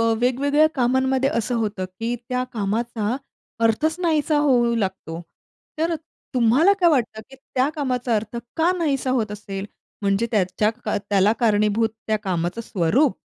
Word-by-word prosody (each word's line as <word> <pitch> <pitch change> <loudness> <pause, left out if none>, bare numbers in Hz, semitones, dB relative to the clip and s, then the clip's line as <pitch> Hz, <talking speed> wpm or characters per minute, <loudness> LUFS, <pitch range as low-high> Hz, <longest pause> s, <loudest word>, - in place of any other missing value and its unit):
अ, 230 0 +3
वेगवेगळ्या 280 +5 +3
कामांमध्ये 260 +1 +2
असं 235 +2 -1
होतं, 205 -3 -2
की 225 +6 -4
त्या 250 0 0
कामाचा 220 +2 -1 0.5
अर्थच 310 +9 +2
नाहीसा 315 -3 +1
होऊ 240 -3 +3
लागतो. 190 -5 -3 0.6
तर 330 +1 +1 0.4
तुम्हाला 255 - +5
काय 350 - +6
वाटतं, 235 -7 0
की 270 - -13
त्या 265 0 -1
कामाचा, 250 -4 -1
अर्थ 215 +2 -4 0.2
का 330 +2 +3
नाहीसा 275 -5 0
होत 215 -3 -2
असेल? 200 -1 -6 0.4
म्हणजे 200 +3 +1
त्याच्या 205 0 +1
का 215 - 0
त्याला 200 0 +2
कारणीभूत 215 0 +2 0.2
त्या 220 - +2
कामाचं 180 +1 -2
स्वरूप 225 - +1
230 Hz, 145 wpm, -22 LUFS, 205-265 Hz, 0.6 s, काय